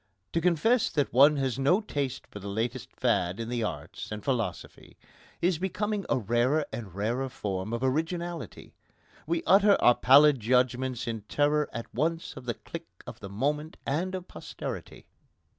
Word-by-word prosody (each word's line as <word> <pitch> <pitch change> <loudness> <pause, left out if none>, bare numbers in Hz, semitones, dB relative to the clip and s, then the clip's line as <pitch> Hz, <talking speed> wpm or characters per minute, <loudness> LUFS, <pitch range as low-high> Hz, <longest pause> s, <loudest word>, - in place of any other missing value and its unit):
To 165 - +1
confess 180 +8 +3
that 145 -3 -1
one 145 +4 +6
has 135 -2 -1
no 145 +9 +4
taste 145 - -3
for 105 - -10
the 100 - -8
latest 115 +4 -3
fad 90 +3 +1
in 115 0 -4
the 120 -1 -1
arts 90 -5 -5
and 105 -1 -6
philosophy 125 -5 -3 0.5
is 175 -2 +2
becoming 200 +2 -2
a - - +2
rarer 120 +7 +1
and 100 -7 -6
rarer 120 +6 -1
form 95 -3 -4
of 115 +2 -2
originality. 165 - -3 0.5
We 165 +1 0
utter 200 +1 +5
our 120 - +6
pallid 140 +3 +6
judgments 125 +2 +1
in 115 -2 -3
terror 150 +1 +2
at 115 - -7
once 165 +6 -1
of 130 -3 -10
the 120 - -2
clique 165 0 -10
of - - -9
the 100 - -8
moment 150 +9 -2
and 180 +7 -1
of 185 -1 -6
posterity. - - -7
135 Hz, 165 wpm, -28 LUFS, 115-165 Hz, 0.5 s, one